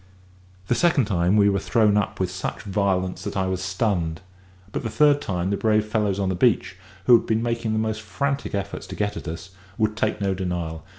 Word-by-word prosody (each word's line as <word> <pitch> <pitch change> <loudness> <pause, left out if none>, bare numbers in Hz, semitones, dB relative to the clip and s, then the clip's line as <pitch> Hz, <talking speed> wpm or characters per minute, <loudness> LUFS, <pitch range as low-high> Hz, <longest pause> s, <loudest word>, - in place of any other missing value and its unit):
The - - +2
second 160 -3 +3
time 90 -1 +2
we 100 -1 +5
were 100 -1 +2
thrown 105 0 +2
up 105 -1 0
with 95 -1 0
such 95 0 -5
violence 95 -2 -1
that - - -4
I 95 - +1
was 95 -1 -2
stunned; 90 -5 -1 0.5
but - - -3
the 115 - -3
third 145 +3 +4
time 90 -3 -2
the 100 - 0
brave 110 0 +2
fellows 105 -3 0
on 95 -1 0
the - - 0
beach, 95 -2 +2 0.3
who 125 - +8
had 115 - +1
been 110 0 +1
making 115 -2 -1
the - - 0
most 110 0 -1
frantic 140 +3 -2
efforts 100 0 -4
to - - -7
get 105 0 -1
at - - -7
us, 85 +3 -6 0.3
would 110 -1 +1
take 110 -1 0
no 100 -1 0
denial. 85 -4 -3
100 Hz, 220 wpm, -24 LUFS, 95-110 Hz, 0.5 s, who